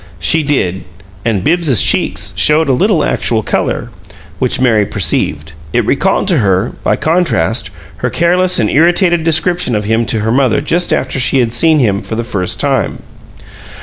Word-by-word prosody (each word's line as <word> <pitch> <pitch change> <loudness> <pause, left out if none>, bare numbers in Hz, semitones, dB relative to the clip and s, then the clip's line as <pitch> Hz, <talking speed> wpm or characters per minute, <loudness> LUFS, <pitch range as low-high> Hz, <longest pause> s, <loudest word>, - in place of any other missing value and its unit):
She 125 - +2
did; 115 - -1 0.4
and 105 -5 -1
Bibbs's 155 - +1
cheeks - - -1
showed 155 +1 +3
a 135 - +2
little 190 - +1
actual 110 -2 -1
color, - - -2 0.5
which 130 0 -1
Mary 115 -5 +2
perceived. 75 -5 -2 0.2
It 120 -2 +1
recalled 190 - 0
to 170 -6 +2
her, 95 0 0
by - - +1
contrast, 155 - 0 0.3
her - - -2
careless 180 +2 +1
and 105 - +1
irritated 175 - +2
description 165 -4 +1
of 105 -1 -2
him 110 +1 0
to 110 - -1
her 110 +1 -1
mother 130 0 +2
just 170 +5 0
after 135 0 -1
she 130 +2 +1
had 120 -3 0
seen 155 +6 +3
him 105 -7 +1
for 110 - -5
the 115 - -2
first 100 -6 -3
time. - - -1
130 Hz, 170 wpm, -13 LUFS, 110-165 Hz, 0.5 s, showed